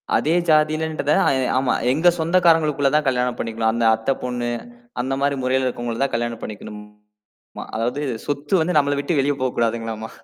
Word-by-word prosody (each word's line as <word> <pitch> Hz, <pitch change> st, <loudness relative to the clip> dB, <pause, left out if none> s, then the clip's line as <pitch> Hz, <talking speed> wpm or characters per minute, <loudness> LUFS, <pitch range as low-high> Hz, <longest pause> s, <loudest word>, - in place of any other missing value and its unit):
அதே 155 Hz, -, +1 dB, 0.2 s
ஜாதிலன்றத 155 Hz, 0 st, +1 dB
ஆ -, -, +3 dB, 0.3 s
ஆமா 130 Hz, -1 st, +1 dB, 0.2 s
எங்க 160 Hz, +6 st, +2 dB
சொந்தக்காரங்களுக்குள்ள 160 Hz, -4 st, +3 dB
தான் 150 Hz, -, +2 dB
கல்யாணம் 125 Hz, -1 st, 0 dB
பண்ணிக்கணும். 115 Hz, -1 st, -1 dB
அந்த 115 Hz, 0 st, 0 dB
அத்தைப் 115 Hz, +5 st, -2 dB
பொண்ணு, 125 Hz, -1 st, -2 dB, 0.5 s
அந்த 130 Hz, +2 st, -2 dB
மாரி 140 Hz, 0 st, +1 dB
முறையில 130 Hz, +1 st, +1 dB
இருக்கவங்கள 120 Hz, 0 st, -4 dB
தான் 140 Hz, -, -2 dB
கல்யாணம் 120 Hz, 0 st, -3 dB
பண்ணிக்கணுமா! 105 Hz, 0 st, -11 dB, 0.5 s
அதாவது 125 Hz, +6 st, -2 dB, 0.2 s
சொத்து 145 Hz, +3 st, -2 dB
வந்து 175 Hz, +1 st, -1 dB
நம்மள 145 Hz, 0 st, +2 dB
விட்டு 145 Hz, +2 st, -1 dB
வெளிய 145 Hz, +1 st, +1 dB
போக்கூடாதுங்களாமா. 115 Hz, -3 st, -2 dB
130 Hz, 150 wpm, -21 LUFS, 115-150 Hz, 0.5 s, ஆ